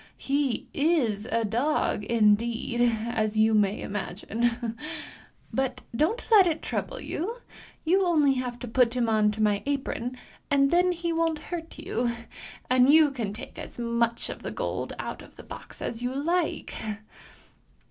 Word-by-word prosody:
He 275 -2 0
is 260 -9 +1
a 230 -2 +1
dog, 235 0 0
indeed, 230 +2 +2 0.2
as 220 -2 -1
you 220 +1 +4
may 210 -1 +3
imagine! 225 +4 -2 0.8
But 260 -1 -1
don't 350 - +1
let 400 -5 +8
it 320 -2 -1
trouble - - -3
you; 395 +9 -3 0.5
you 375 +4 +4
only 305 -6 +4
have 250 -2 -3
to 245 - -5
put 240 +1 +3
him 240 -2 +1
on 215 -1 +3
to 215 0 -1
my 205 -1 +2
apron 255 -3 -2 0.3
and 275 -1 +4
then 360 +1 +4
he 340 -1 -2
won't 330 -1 +1
hurt 325 +1 -7
you, 240 0 -1 0.6
and 255 +2 +5
you 310 -1 +6
can 230 -7 -3
take 235 +6 -9
as - - -9
much 235 0 0 0.2
gold - - -2
out - - -5
of - - -15
the - - -11
box - - -10
as 230 - -4
you 250 +1 -2
like! 335 +4 0
250 Hz, 150 wpm, -27 LUFS, 225-305 Hz, 0.8 s, let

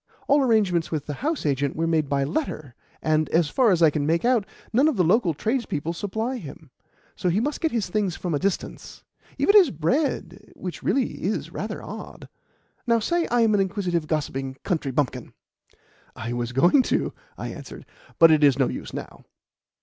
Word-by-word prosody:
All 285 +1 +4
arrangements 205 - +2
with 150 -3 -3
the 145 - -4
house 310 - -1
agent 140 -1 0
were 165 - 0
made 160 -3 +1
by 140 -1 +1
letter, 150 - -3 0.3
and, 155 0 +1
as 165 -2 +2
far 255 -4 +3
as 175 -4 +3
I 155 - +6
can 145 0 -1
make 165 +7 +1
out, 240 -5 +2 0.3
none 265 +7 +4
of 310 - +1
the 180 - +4
local 180 -1 +2
tradespeople 215 - -2
supply 220 +8 -3
him, 155 - -11 0.4
so 180 - -1
he 180 +4 +2
must 285 +6 -2
get 320 - +2
his 225 -5 -1
things 190 -1 -1
from 175 -3 -3
a 145 - +1
distance 195 +2 -4 0.3
even 405 - +3
his 380 -8 +8
bread, 200 - -2
which 180 -2 -6
really 270 -1 -1
is - - -2
rather - - -5
odd. - - -9 0.6
Now 235 -1 +4
say 340 +9 0
I 240 0 +2
am 225 -2 +3
an 205 - +3
inquisitive, 180 -4 -1
gossiping 135 -4 -2
country 160 -7 -1
bumpkin." 135 0 -2 0.8
"I 115 +2 -5
was 120 0 -3
going 175 - +5
to," - - 0 0.2
I - - -5
answered, - - -9 0.3
"but 165 -1 +7
it 155 -1 +4
is 140 -2 +5
no 135 - +2
use - - -6
now." - - -8
175 Hz, 190 wpm, -24 LUFS, 150-230 Hz, 0.8 s, his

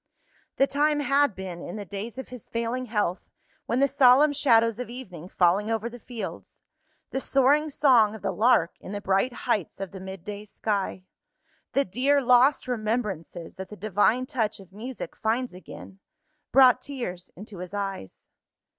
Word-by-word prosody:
The 275 - +4
time 295 +1 +1
had 280 -4 +2
been, 185 -2 -7
in 175 - -7
the 205 -1 -6
days 200 +6 -6
of 265 - -7
his 250 -3 -10
failing 235 +2 -2
health, 205 -5 -2 0.4
when 235 - 0
the 275 - +4
solemn 275 +2 +5
shadows 230 -5 +3
of 250 - -5
evening 185 -9 -9
falling 190 +5 +2
over 225 +1 -2
the 245 - -10
fields 235 -1 -8 0.5
the 265 - -1
soaring 275 +3 +3
song 245 -7 +4
of 220 - -11
the - - 0
lark 215 -7 +3
in 190 - -9
the 205 - -3
bright 195 +5 +1
heights 220 -8 -2
of 195 -2 -5
the 195 - -9
midday 190 +2 -7
sky 200 -3 -3 0.7
the 275 +2 +2
dear 270 +9 +2
lost 255 +2 +4
remembrances 210 -8 -3
that 190 0 -7
the 210 - -9
divine 215 +5 +1
touch 225 -6 -2
of 190 -1 -15
music 240 +5 -7
finds 235 +1 -1
again 180 +2 -12 0.5
brought 255 -1 +6
tears 235 -11 -6
into 200 0 -10
his 180 +2 -7
eyes. 195 - -5
225 Hz, 165 wpm, -26 LUFS, 195-255 Hz, 0.7 s, brought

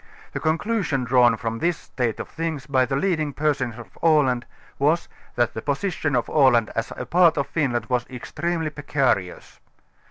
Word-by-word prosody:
The - - -2
con 155 +1 +1
clusion 180 - -1
drawn 120 -2 +4
from 115 0 -3
this 170 +2 +1
state 120 -4 -3
of - - -5
things 160 -4 -4
by 130 -3 +2
the 135 - -1
leading 155 -2 0
persons 140 -6 -1
of 120 - -12
Aland, 140 -7 +3 0.3
was, 155 +5 +2 0.3
that 120 -1 +1
the 110 - -5
position 145 - -1
of 120 -2 0
x\.land 125 -7 +4
as 115 - -2
a 125 - -4
part 170 +3 +4
of 140 - +1
Finland 125 -8 -1
was 125 -1 -1
extremely' 160 +5 -3
precarious. 135 -11 -1
140 Hz, 170 wpm, -23 LUFS, 120-155 Hz, 0.3 s, drawn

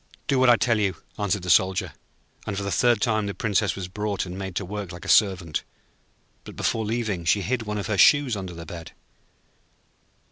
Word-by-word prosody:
'Do 135 - +1
what 130 -1 +5
I 120 - +8
tell 115 -1 +1
you,' 100 -4 0 0.2
answered 100 -2 -1
the 90 - +1
Soldier; 95 +1 +2 0.5
and 100 -2 -3
for 100 - -2
the 100 - -3
third 120 -1 +3
time 110 -2 +1
the 100 - -4
Princess 105 -2 0
was 95 -2 -5
brought 105 +1 -3
and 90 0 -7
made 95 -1 -6
to 100 - -2
work 100 -1 -6
like 85 - -10
a - - -7
servant. 90 -7 +2 0.8
But - - -11
before 110 - -1
leaving 110 -5 -2
she 100 +4 +2
hid 120 +6 -1
one 105 0 -2
of 100 - -3
her 105 -4 -1
shoes 145 -2 +5
under 95 -3 -6
the 85 0 -8
bed. 85 -2 -9
100 Hz, 210 wpm, -25 LUFS, 95-110 Hz, 0.8 s, I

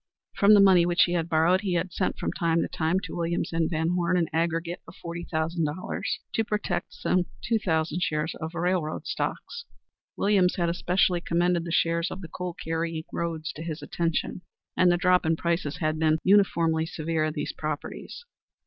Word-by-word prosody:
From 205 +1 +6
the - - +6
money 190 -3 +7
which 175 0 +4
he 175 - 0
had 170 -1 -1
borrowed 165 +4 +3
he 190 -4 -1
had 175 +1 -1
sent, 185 - -1
from - - -2
time 170 -2 +1
to - - -2
time, 165 +3 0
to - - -7
Williams 170 0 -2
and 165 -1 +1
Van 160 0 0
Horne 180 0 +1
an 170 -3 +1
aggregate 165 +1 -1
of - - -12
forty 170 0 -6
thousand 160 +1 0
dollars 150 +5 -3
to 225 - +1
protect 210 -5 -3
some 180 -1 0 0.2
two 230 -1 +1
thousand 160 -3 0
shares 155 -1 -1
of 160 +2 -5
railroad 175 -2 -1
stocks. 470 0 -4 0.5
Williams 195 -3 +3
had 170 -2 0
especially 180 0 +1
commended 175 0 +1
the 170 - -4
shares 170 +1 +1
of 195 - -7
the 170 - -7
coal 180 0 -5
carrying 165 0 -3
roads 165 -2 -3
to 155 - -9
his 160 -2 -5
attention, 165 +3 -2 0.3
and 180 -1 +5
the 175 - +3
drop 180 0 +3
in 160 0 +2
prices 170 -3 -1
had 155 -1 -1
been 155 -1 +3
uniformly 170 -5 +3
severe 160 -1 -2
in 155 0 -1
these 150 - -3
properties. 155 - -6
170 Hz, 195 wpm, -27 LUFS, 160-180 Hz, 0.5 s, money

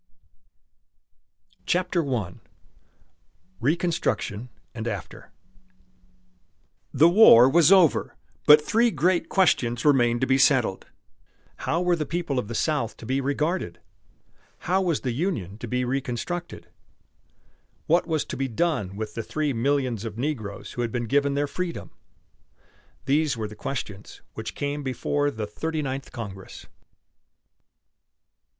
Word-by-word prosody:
CHAPTER 180 -1 +1
I 115 - -2 1.3
RECONSTRUCTION 130 - -1 0.2
AND 115 0 -5
AFTER 100 -6 -6 1.6
The 160 - +5
war 170 - +8
was 165 +5 +5
over, 185 -6 +4 0.3
but 150 +1 +9
three 235 +1 +3
great 180 -3 +1
questions 125 - +1
remained 120 -4 +3
to - - +3
be 130 +1 +2
settled. - - +2 0.8
How 170 - +1
were 180 -1 +2
the 155 -3 -4
people 170 -6 -2
of 105 - -4
the 115 - -6
South 145 -7 -1
to - - -11
be 130 +3 0
regarded? 145 - -2 0.9
How 185 +3 +2
was 170 -5 0
the 130 - -2
Union 115 - -3
to 120 - -6
be 125 +2 -1
reconstructed? 135 +7 -4 1.2
What 170 +2 +2
was 155 -3 -1
to - - -6
be 135 - -2
done 115 - -1
with 105 0 -5
the 115 - -3
three 150 +4 -2
millions 125 -2 0
of 110 -2 -6
negroes 120 -7 -4
who 120 - -4
had 120 -1 -2
been 120 0 -2
given 140 +3 +1
their 145 +1 +1
freedom? 175 +4 -5 1.1
These 145 -1 +1
were 110 -1 -3
the 105 - -10
questions 105 -5 -6
which - - -7
came 145 +1 -3
before 145 +2 -1
the 110 -5 -4
Thirty 155 +9 -4
Ninth 135 0 -5
Congress. 100 -5 -8
135 Hz, 130 wpm, -25 LUFS, 115-160 Hz, 1.6 s, but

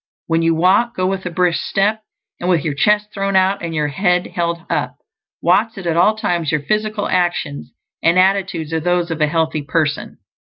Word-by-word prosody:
When 165 0 +1
you 165 0 +2
walk, 190 +8 +2
go 185 - -1
with 190 0 -2
a - - -2
brisk 175 0 0
step, 210 +3 0 0.4
and 175 - -2
with 170 -4 +2
your 150 - 0
chest 210 +7 +1
thrown 195 -1 -2
out 190 +1 +2
and 165 -1 -4
your 150 -1 0
head 180 +3 +1
held 170 -1 -3
up; - - -2 0.5
watch 210 +7 +2
that 195 - -8
at 165 -1 0
all 185 +6 +4
times 175 -8 -1
your 150 - 0
physical 215 +3 -1
actions 175 -5 -1 0.3
and 170 +2 +3
attitudes 185 -4 +1
are 160 - +1
those 175 +1 0
of 160 -1 -3
a 150 - +4
healthy 160 -1 0
person. 155 0 -2
175 Hz, 200 wpm, -18 LUFS, 165-195 Hz, 0.5 s, all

